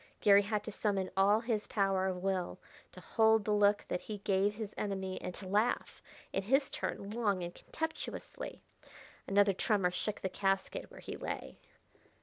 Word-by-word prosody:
Garry 200 Hz, -1 st, +7 dB
had 210 Hz, 0 st, -1 dB
to 220 Hz, -, -5 dB
summon 200 Hz, -3 st, -1 dB
all 200 Hz, +3 st, +4 dB
his 225 Hz, -3 st, -1 dB
power 195 Hz, -2 st, +1 dB
of 180 Hz, -1 st, -3 dB
will 190 Hz, -2 st, -1 dB, 0.3 s
to -, -, -11 dB
hold 220 Hz, -2 st, +3 dB
the 215 Hz, -, 0 dB
look 205 Hz, 0 st, +4 dB
that 180 Hz, -, -2 dB
he 215 Hz, -, -5 dB
gave 200 Hz, +1 st, +1 dB
his 215 Hz, -1 st, -5 dB
enemy 190 Hz, -2 st, -3 dB
and 180 Hz, -, -5 dB
to 190 Hz, -, -8 dB
laugh, 210 Hz, +5 st, 0 dB, 0.3 s
in -, -, +1 dB
his 270 Hz, +7 st, +2 dB
turn, 200 Hz, +1 st, -4 dB
long 205 Hz, -5 st, 0 dB
and 175 Hz, 0 st, -5 dB
contemptuously. 320 Hz, 0 st, -5 dB, 0.6 s
Another 200 Hz, 0 st, +4 dB
tremor 190 Hz, -2 st, +2 dB
shook 205 Hz, +4 st, -2 dB
the -, -, 0 dB
casket 195 Hz, +1 st, -1 dB
where -, -, -12 dB
he -, -, -6 dB
lay. -, -, -5 dB
200 Hz, 170 wpm, -33 LUFS, 190-215 Hz, 0.6 s, Garry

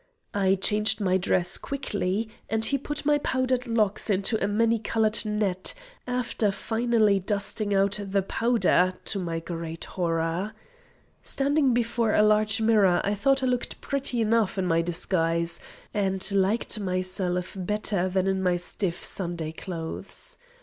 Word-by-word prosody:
I 195 Hz, -1 st, +3 dB
changed 210 Hz, +3 st, +1 dB
my 185 Hz, -2 st, +2 dB
dress 180 Hz, -1 st, +1 dB
quickly, 215 Hz, -6 st, -2 dB, 0.2 s
and 220 Hz, 0 st, +1 dB
he 275 Hz, +3 st, +1 dB
put 295 Hz, +2 st, -5 dB
my 295 Hz, 0 st, +4 dB
powdered 255 Hz, -2 st, 0 dB
locks 215 Hz, -2 st, +1 dB
into 200 Hz, +2 st, +1 dB
a -, -, +2 dB
many 225 Hz, +2 st, +2 dB
coloured 220 Hz, 0 st, +1 dB
net, 210 Hz, -, 0 dB, 0.3 s
after 245 Hz, -4 st, 0 dB
finally 220 Hz, -1 st, +2 dB
dusting 205 Hz, +2 st, -2 dB
out 195 Hz, +1 st, +2 dB
the 195 Hz, -1 st, 0 dB
powder, 195 Hz, -4 st, +2 dB
to 200 Hz, -, -1 dB
my 165 Hz, -3 st, -2 dB
great 165 Hz, -1 st, -6 dB
horror. 170 Hz, +3 st, -1 dB, 0.7 s
Standing 275 Hz, -2 st, +1 dB
before 235 Hz, -2 st, +1 dB
a 210 Hz, -, +5 dB
large 215 Hz, 0 st, +3 dB
mirror 210 Hz, -5 st, +4 dB
I 200 Hz, -, +1 dB
thought 270 Hz, +6 st, +2 dB
I -, -, +3 dB
looked 250 Hz, -1 st, -1 dB
prettily 270 Hz, -4 st, -1 dB
enough 220 Hz, -2 st, +2 dB
in 190 Hz, -, 0 dB
my 165 Hz, -1 st, +2 dB
disguise, 170 Hz, -1 st, 0 dB, 0.3 s
and 195 Hz, -1 st, 0 dB
liked 200 Hz, +3 st, +1 dB
myself 185 Hz, -1 st, -1 dB
better 195 Hz, -1 st, -1 dB
than 190 Hz, 0 st, +1 dB
in 190 Hz, 0 st, 0 dB
my 180 Hz, -1 st, +2 dB
stiff 175 Hz, 0 st, -3 dB
Sunday 170 Hz, -4 st, -2 dB
clothes. 175 Hz, -, -6 dB
205 Hz, 145 wpm, -26 LUFS, 185-225 Hz, 0.7 s, a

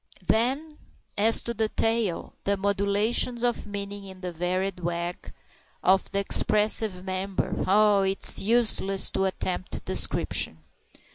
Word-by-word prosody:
Then 270 Hz, -, -1 dB, 0.4 s
as 220 Hz, +3 st, +4 dB
to 235 Hz, -, -4 dB
the 220 Hz, -1 st, -1 dB
tail 225 Hz, -6 st, -1 dB
the 200 Hz, 0 st, 0 dB
modulations 200 Hz, +5 st, 0 dB
of 240 Hz, -3 st, -1 dB
meaning 200 Hz, 0 st, -7 dB
in 190 Hz, -1 st, -12 dB
the 180 Hz, -1 st, -5 dB
varied 180 Hz, +2 st, -3 dB
wag 175 Hz, 0 st, -5 dB, 0.5 s
of 190 Hz, +1 st, +2 dB
that 200 Hz, -, -1 dB
expressive 210 Hz, -2 st, +3 dB
member 190 Hz, +1 st, -3 dB
oh! 205 Hz, +1 st, +3 dB
it's 195 Hz, 0 st, +4 dB
useless 210 Hz, -3 st, +1 dB
to 190 Hz, -, -1 dB
attempt 185 Hz, -1 st, -3 dB
description. 80 Hz, -, 0 dB
200 Hz, 125 wpm, -25 LUFS, 190-220 Hz, 0.5 s, as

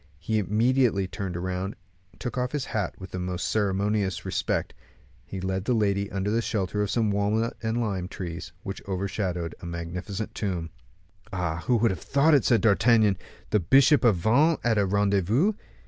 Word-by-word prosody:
He 110 Hz, +7 st, -1 dB
immediately 110 Hz, 0 st, +2 dB
turned 95 Hz, -2 st, -4 dB
round, 95 Hz, +3 st, -3 dB, 0.4 s
and -, -, -25 dB
took 120 Hz, -, -4 dB
off 125 Hz, +1 st, -1 dB
his 145 Hz, -3 st, -1 dB
hat 105 Hz, -5 st, -1 dB
with 95 Hz, -1 st, -10 dB
the 90 Hz, -, -4 dB
most 90 Hz, -1 st, -2 dB
ceremonious 100 Hz, -1 st, 0 dB
respect; -, -, -1 dB, 0.5 s
he 95 Hz, -, -6 dB
led 95 Hz, +1 st, -2 dB
the 125 Hz, -, +2 dB
lady 100 Hz, -2 st, +1 dB
under 100 Hz, +1 st, -1 dB
the 115 Hz, +2 st, +2 dB
shelter 105 Hz, -2 st, -1 dB
of 105 Hz, -, 0 dB
some 110 Hz, -2 st, +1 dB
walnut 105 Hz, +3 st, 0 dB
and 115 Hz, +1 st, -1 dB
lime 100 Hz, -6 st, -2 dB
trees, 90 Hz, 0 st, -6 dB
which 95 Hz, -, -5 dB
overshadowed 95 Hz, -3 st, -2 dB
a 85 Hz, -, -7 dB
magnificent 90 Hz, +5 st, -5 dB
tomb. 90 Hz, -6 st, -3 dB, 0.6 s
"Ah! 90 Hz, -4 st, -2 dB
who 125 Hz, -, +4 dB
would 115 Hz, -1 st, +3 dB
have 90 Hz, -, -5 dB
thought 140 Hz, +3 st, +3 dB
it," 140 Hz, -, +5 dB
said 120 Hz, -3 st, +4 dB
D'Artagnan; 110 Hz, -1 st, +4 dB, 0.4 s
"the 105 Hz, -, +4 dB
bishop 135 Hz, -, +5 dB
of 115 Hz, -5 st, +5 dB
Vannes 135 Hz, -, +3 dB
at 115 Hz, -3 st, +2 dB
a 100 Hz, -, +2 dB
rendezvous! 100 Hz, -, +2 dB
100 Hz, 180 wpm, -26 LUFS, 95-115 Hz, 0.6 s, it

